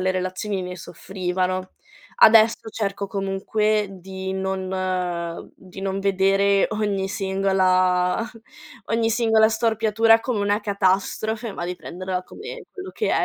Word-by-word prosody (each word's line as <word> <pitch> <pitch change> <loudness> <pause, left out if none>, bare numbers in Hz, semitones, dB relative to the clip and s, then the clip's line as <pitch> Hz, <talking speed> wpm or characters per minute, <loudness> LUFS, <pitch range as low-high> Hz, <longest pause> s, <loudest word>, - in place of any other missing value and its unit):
le 185 0 +1
relazioni 185 +2 -3
ne 180 0 -6
soffrivano. 185 0 -3 0.5
Adesso 225 0 +6
cerco, 200 -2 -3
comunque, 205 +2 0
di 190 0 -6
non 185 -3 -3
di 190 0 -12
non 195 0 -2
vedere 195 0 +3
ogni 205 -3 -1
singola 185 -1 +1 0.6
ogni 225 0 +1
singola 220 -1 +4
storpiatura 225 0 +3
come 230 -3 -2
una 205 +1 +1
catastrofe, 205 +3 0
ma 175 - -5
di 180 0 -4
prenderla 185 +1 -5
come 470 - -9
quello 380 -1 -8
che 440 - -2
è, - - +2
195 Hz, 120 wpm, -23 LUFS, 185-215 Hz, 0.6 s, Adesso